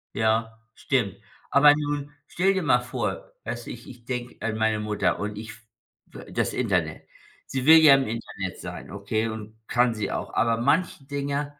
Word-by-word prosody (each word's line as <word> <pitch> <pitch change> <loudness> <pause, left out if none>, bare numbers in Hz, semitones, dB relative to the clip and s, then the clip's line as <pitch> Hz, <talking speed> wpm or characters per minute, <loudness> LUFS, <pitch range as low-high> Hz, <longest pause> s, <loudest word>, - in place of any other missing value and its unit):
Ja, 110 0 +1 0.2
stimmt. 105 -8 -1 0.3
Aber 145 +1 +7
nun 145 -1 -3 0.2
stell 190 +3 +2
dir 190 -2 -1
mal 130 -5 +4
vor, 125 - -4
weißt 120 -1 -5
du? - - -5
Ich 120 - -10
ich 120 -2 -13
denke 125 -1 -5
an 110 0 -2
meine 110 -1 +1
Mutter 105 -1 0
und 105 0 -4
ich 110 0 -7
f 105 +2 -11 0.5
äh, - - -11
das - - -1
Internet. - - -1 0.4
Sie 130 -1 -3
will 160 +2 +9
ja 150 -3 +8
im 135 -1 0
Internet 115 +1 -5
sein. - - -8
Okay, 100 +3 -2
und 110 0 -7
kann 120 -1 +2
sie 105 -3 -3
auch. - - -4
Aber 115 -1 +2
manche 140 +6 +1
Dinger, 145 +1 -3
120 Hz, 185 wpm, -25 LUFS, 110-140 Hz, 0.5 s, will